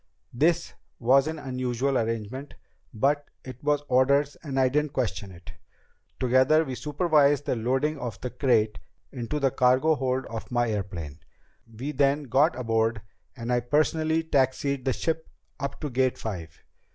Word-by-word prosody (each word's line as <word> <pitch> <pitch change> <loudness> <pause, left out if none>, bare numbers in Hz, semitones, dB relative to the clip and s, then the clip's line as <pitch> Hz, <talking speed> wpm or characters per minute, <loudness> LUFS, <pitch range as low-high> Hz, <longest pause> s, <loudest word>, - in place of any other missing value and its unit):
This 165 +7 +1 0.2
was 135 +4 +4
an 160 0 -3
unusual 130 -1 -2
arrangement, 115 +4 -3 0.4
but 140 +5 0 0.2
it 130 0 -10
was 145 0 +1
orders 140 +3 +3
and 135 -4 -3
I 130 - +5
didn't 150 +2 0
question 105 -6 -2
it. 85 -1 -12 0.7
Together 130 +5 +4
we 130 - -5
supervised 145 0 +2
the - - 0
loading 135 +6 0
of 120 -5 -5
the 125 - -5
crate 110 -5 +1 0.3
into 130 +3 -3
the 135 -2 +2
cargo 130 +6 +3
hold 130 -2 -1
of 115 -1 -7
my 120 -2 +1
airplane. 85 -8 -5 0.5
We 125 +7 -5
then 140 +1 +2
got 140 +5 +2
aboard, 115 -2 0 0.3
and 115 +1 -2
I 120 - +3
personally 155 +5 +1
taxied 140 -2 0
the 130 - +2
ship 160 +3 -2 0.3
up 140 0 -4
to 150 - -2
Gate 130 0 +1
Five. 85 -7 -7
130 Hz, 150 wpm, -26 LUFS, 120-145 Hz, 0.7 s, I